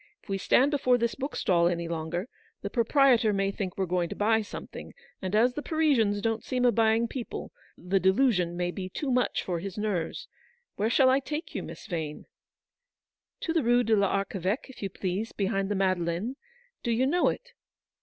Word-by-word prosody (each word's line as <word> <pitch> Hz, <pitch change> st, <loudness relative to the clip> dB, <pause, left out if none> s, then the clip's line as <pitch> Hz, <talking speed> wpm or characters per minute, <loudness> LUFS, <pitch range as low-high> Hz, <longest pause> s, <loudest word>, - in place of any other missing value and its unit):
If -, -, -24 dB
we 195 Hz, 0 st, -1 dB
stand 265 Hz, +8 st, +3 dB
before 255 Hz, -4 st, +3 dB
this 235 Hz, -1 st, 0 dB
book 275 Hz, +2 st, -5 dB
stall 170 Hz, -2 st, +3 dB
any 170 Hz, -1 st, -1 dB
longer, 170 Hz, +4 st, -3 dB, 0.4 s
the -, -, -4 dB
proprietor 240 Hz, -2 st, +4 dB
may 195 Hz, 0 st, +1 dB
think 190 Hz, -2 st, -5 dB
we're 190 Hz, -, +1 dB
going 175 Hz, -1 st, 0 dB
to -, -, -5 dB
buy 220 Hz, +2 st, +2 dB
something, 205 Hz, -, -9 dB, 0.3 s
and 190 Hz, +2 st, -2 dB
as 240 Hz, +3 st, +4 dB
the 295 Hz, -, -4 dB
Parisians 270 Hz, -11 st, +2 dB
don't 225 Hz, -1 st, 0 dB
seem 250 Hz, -1 st, 0 dB
a 245 Hz, -, +6 dB
buying 225 Hz, 0 st, +3 dB
people, 240 Hz, 0 st, -6 dB, 0.3 s
the 190 Hz, +2 st, 0 dB
delusion 190 Hz, -3 st, +2 dB
might 175 Hz, 0 st, -1 dB
be 185 Hz, -2 st, -5 dB
too 270 Hz, +8 st, -3 dB
much 250 Hz, 0 st, +1 dB
for 175 Hz, -2 st, -2 dB
his 195 Hz, +2 st, -6 dB
nerves. 210 Hz, -, -2 dB, 0.5 s
Where 215 Hz, +2 st, 0 dB
shall 260 Hz, +1 st, +5 dB
I 265 Hz, -, +4 dB
take 300 Hz, +4 st, -5 dB
you, -, -, -3 dB
Miss -, -, -9 dB
Vane? 160 Hz, -4 st, -4 dB, 0.6 s
" -, -, -65 dB
"To 325 Hz, -, -1 dB
the 330 Hz, -, +2 dB
Rue 245 Hz, 0 st, +3 dB
de 225 Hz, -, +1 dB
PArcheveque, 195 Hz, +3 st, 0 dB
if -, -, -14 dB
you 195 Hz, -, -2 dB
please, 190 Hz, +3 st, -3 dB
behind 195 Hz, -1 st, -1 dB
the 205 Hz, -, 0 dB
Madeleine. 185 Hz, +4 st, 0 dB, 0.5 s
Do 240 Hz, -, -3 dB
you 235 Hz, +3 st, +2 dB
know 345 Hz, +6 st, +2 dB
it -, -, -6 dB
210 Hz, 195 wpm, -28 LUFS, 185-250 Hz, 0.6 s, a